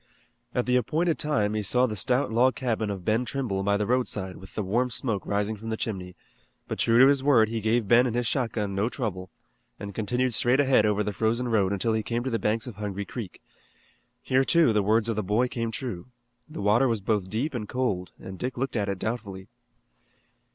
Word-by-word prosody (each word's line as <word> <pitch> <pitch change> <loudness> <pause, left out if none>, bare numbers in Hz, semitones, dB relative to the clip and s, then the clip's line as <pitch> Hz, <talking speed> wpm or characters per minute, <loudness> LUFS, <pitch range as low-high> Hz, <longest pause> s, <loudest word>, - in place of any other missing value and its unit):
At 125 - +1
the 125 0 +3
appointed 155 +6 0
time 110 -9 +1
he 110 - -1
saw 125 +6 +2
the 110 -4 -3
stout 125 +4 +1
log 125 +3 +3
cabin 115 -4 -1
of 95 -3 -5
Ben 110 +3 +2
Trimble 120 -6 -2
by 100 +1 +1
the 105 - -1
roadside 105 -6 -1
with 95 0 -13
the 105 - -1
warm 120 +7 0
smoke 110 -3 -3
rising 105 +2 -1
from 110 +2 -8
the 110 - -2
chimney, 95 -5 -5 0.5
but - - -5
true 115 0 +3
to 130 - +8
his 140 0 +4
word 125 -6 +4
he 115 -1 -3
gave 110 0 +1
Ben 120 +4 +5
and 120 - -3
his 120 0 0
shotgun 115 -5 -1
no 100 +4 0
trouble, 95 -9 -4 0.5
and 100 0 -7
continued 120 +5 -1
straight 125 +4 +2
ahead 130 -6 +4
over 105 0 +1
the 105 - -3
frozen 115 +4 0
road 100 -4 +2
until 100 +3 0
he 110 - +1
came 120 +2 -2
to 130 - -3
the 115 - 0
banks 110 +2 0
of 120 -5 -8
Hungry 100 -1 -4
Creek. 105 -6 -8 0.8
Here, 130 +1 +2
too, 160 -4 +4
the 105 - +3
words 110 +3 +2
of 115 - -1
the 105 - 0
boy 105 +6 +1
came 115 -2 -3
true. 115 -6 -5 0.4
The 150 -10 -6
water 115 +6 +4
was 115 -3 0
both 100 -2 -1
deep 130 +9 -2
and 110 -4 -4
cold, 105 -8 -2
and 95 -1 -9
Dick 125 0 -4
looked 135 0 -2
at 100 -3 0
it 100 - -2
doubtfully. 100 -3 -5
110 Hz, 220 wpm, -26 LUFS, 100-125 Hz, 0.8 s, to